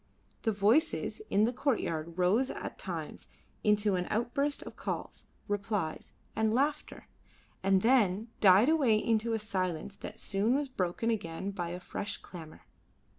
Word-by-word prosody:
The 225 - +1
voices 225 - +2
in 205 - +3
the 235 +3 +2
courtyard 170 - -1
rose 200 +9 +3
at - - -6
times - - -6 0.4
into 210 -1 +3
an 180 -1 -1
outburst 260 +6 -1
of - - -10
calls, - - -5 0.2
replies, 200 -5 -2 0.2
and 220 0 +2
laughter, 290 +3 -1 0.6
and 190 0 +3
then 225 -3 +3
died 195 +4 +7
away 280 -9 +4
into 225 +1 +1
a - - +2
silence 190 -3 -2
that - - -8
soon 210 +5 +1
was 285 -1 -1
broken 210 0 -1
again 190 -2 -3
by 175 -3 -4
a 175 +1 -5
fresh 190 +2 -4
clamour. 160 -3 -11
210 Hz, 145 wpm, -31 LUFS, 185-235 Hz, 0.6 s, died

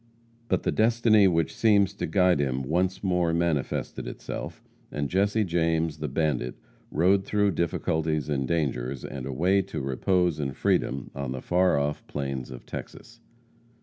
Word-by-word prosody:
But - - 0
the - - +1
destiny 110 -2 +4
which 85 +1 +1
seems 105 -4 +3
to - - -4
guide 90 -5 +3
him 65 -1 0
once 90 +8 0
more 90 -3 +1
manifested 85 -5 -1
itself, - - -6 0.3
and 70 -1 -2
Jesse 100 +4 +2
James, 80 -3 0
the 75 - -2
bandit, 65 -4 -1 0.3
rode 95 +4 +3
through 105 0 +1
difficulties 80 -3 -1
and 70 -3 -1
dangers, 65 -5 -1
and 65 -1 -6
away 90 +9 +2
to 95 +1 -6
repose 85 +5 +1
and 70 -2 -3
freedom 65 +1 0
on 70 -2 -4
the 65 - -5
far 90 -1 +3
off 70 +1 -2
plains 70 -3 -4
of 65 -2 -10
Texas. 115 0 -9
80 Hz, 150 wpm, -27 LUFS, 70-95 Hz, 0.3 s, destiny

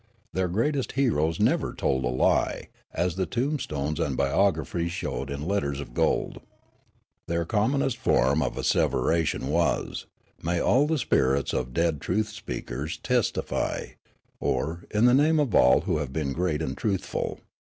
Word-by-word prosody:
Their 95 0 0
greatest 130 - -1
heroes 80 - +1
never - - +1
told 65 -1 0
a - - +1
lie, 65 +1 +1 0.2
as 85 +1 -1
the 95 - 0
tombstones 80 - -2
and 70 -6 -1
biographies 85 +2 +1
showed 85 -6 -4
in 70 +2 -4
letters 70 -8 -1
of 70 -4 -8
gold. - - 0 0.9
Their 85 0 -1
commonest 120 - +1
form 70 - +2
of - - -1
asseveration 80 -5 +1
was, 85 +5 0 0.2
" - - -33
May 85 +1 0
all 135 - +3
the 160 0 +1
spirits 70 - +1
of 65 0 -2
dead 80 +1 0
truth 105 +4 0
speakers 80 - -5
test 125 -3 0
ify," - - -3 0.5
or 85 +3 -2
" - - -36
In 105 +2 +2
the 125 - +6
name 155 +4 +4
of 140 -7 0
all 65 - +6
who - - 0
have 75 -3 -3
been 70 -1 -2
great 80 -2 -1
and 70 -2 -3
truthful." 100 +1 -2
85 Hz, 160 wpm, -26 LUFS, 70-110 Hz, 0.9 s, the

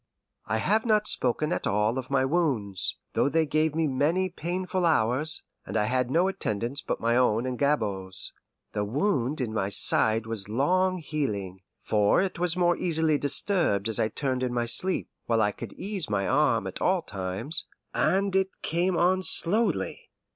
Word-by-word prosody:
I 110 - 0
have 210 - +1
not 215 -2 +2
spoken 150 +6 0
at - - -2
all 105 +5 +1
of 130 - -8
my 135 -1 +2
wounds, 130 - 0 0.2
though - - +2
they 160 +2 +2
gave 155 +1 0
me 165 0 +1
many 155 +7 +1
painful 180 +2 -3
hours, 150 0 +2 0.2
and - - -4
I - - +2
had 125 +3 0
no 170 +7 +2
attendance 120 - -3
but - - -3
my 115 +1 +1
own 120 -2 +2
and 130 -1 -2
Gabord's. 100 -10 -2 0.4
The 105 - -2
wound 140 - 0
in 120 -4 -2
my 100 -3 -1
side 110 +2 +3
was 110 -3 -2
long 185 - +1
healing, 105 - -4 0.2
for 105 -1 +2
it 185 -2 -2
was 180 0 0
more 175 -1 +3
easily 160 -3 +1
disturbed 145 - +2
as 110 - +1
I - - +2
turned 130 +3 -2
in 125 -1 -1
my 120 -1 0
sleep, 180 +11 +1 0.2
while 115 -1 +2
I 105 -1 +2
could 110 -1 -9
ease 195 - -3
my 100 -2 0
arm 130 -8 +2
at 95 - -5
all 185 -2 +2
times, 95 - -2 0.3
and 195 0 +1
it 190 0 -1
came 175 +2 0
on 185 +2 +3
slowly. 195 +1 +1
140 Hz, 175 wpm, -27 LUFS, 110-175 Hz, 0.4 s, side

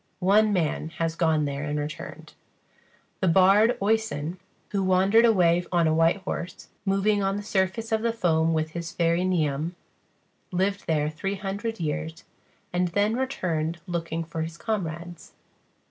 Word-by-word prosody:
One 205 +3 +4
man 160 -4 0
has 165 -1 -1
gone 160 -3 +2
there 140 0 -3
and 150 0 -2
returned. 150 0 -6 0.9
The 190 - +1
bard, 195 +6 +5
Oisen, 195 -6 -1 0.3
who 200 -2 -1
wandered 190 +5 +4
away 175 -6 +4
on 170 -2 +3
a 155 - +2
white 165 +4 +3
horse, 180 -1 -5 0.2
moving 200 +1 +2
on 195 0 0
the 205 - -5
surface 200 +3 -1
of 220 -1 +1
the 230 0 +1
foam 165 -7 +1
with 155 -1 -1
his 170 0 -5
fairy 170 0 +1
Niamh, 165 -2 0 0.8
lived 190 +2 -1
there 150 -2 +1
three 195 +6 -3
hundred 200 +3 -4
years, 160 +1 -3 0.5
and 180 0 +1
then 205 +5 +1
returned 170 - -2
looking 165 -2 -3
for 165 0 -5
his 165 +1 -5
comrades. 175 -6 -4
175 Hz, 150 wpm, -26 LUFS, 160-200 Hz, 0.9 s, bard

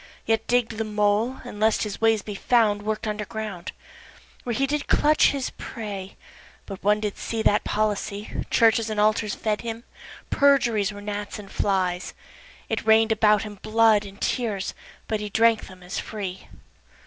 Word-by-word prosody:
Yet 225 0 0
digg'd 235 -2 +1
the - - +1
mole, 210 +3 0
and 210 -4 -8
lest 220 +1 +3
his 210 0 -5
ways 225 -2 +3
be 210 - -6
found 210 -1 +2
Work'd 215 +1 -3
under 210 0 -2
ground, 210 -5 -6 0.7
Where 240 -2 -2
he 275 - +2
did 290 +1 -2
clutch 305 +1 +4
his 275 -2 -2
prey, 200 -4 -6 0.5
but 195 -2 -9
one 210 +1 +3
did 210 -2 -4
see 225 -1 -3
That 210 0 +3
policy, 210 -1 -2 0.2
Churches 225 -1 +3
and 215 -1 -2
altars 210 0 +2
fed 215 -1 -1
him, 230 0 -5 0.5
perjuries 240 -8 +3
Were 205 0 -9
gnats 205 0 -5
and 205 -2 -11
flies, 185 -2 -1 0.5
It 225 - -2
rain'd 220 0 +4
about 210 -1 +4
him 205 -2 -9
blood 220 -1 +4
and 200 0 -11
tears, 215 -6 -1 0.3
but 215 -1 -1
he 210 0 -4
Drank 225 +2 +3
them 185 -1 -14
as 180 - -4
free. 190 -3 -6
215 Hz, 170 wpm, -25 LUFS, 205-225 Hz, 0.7 s, clutch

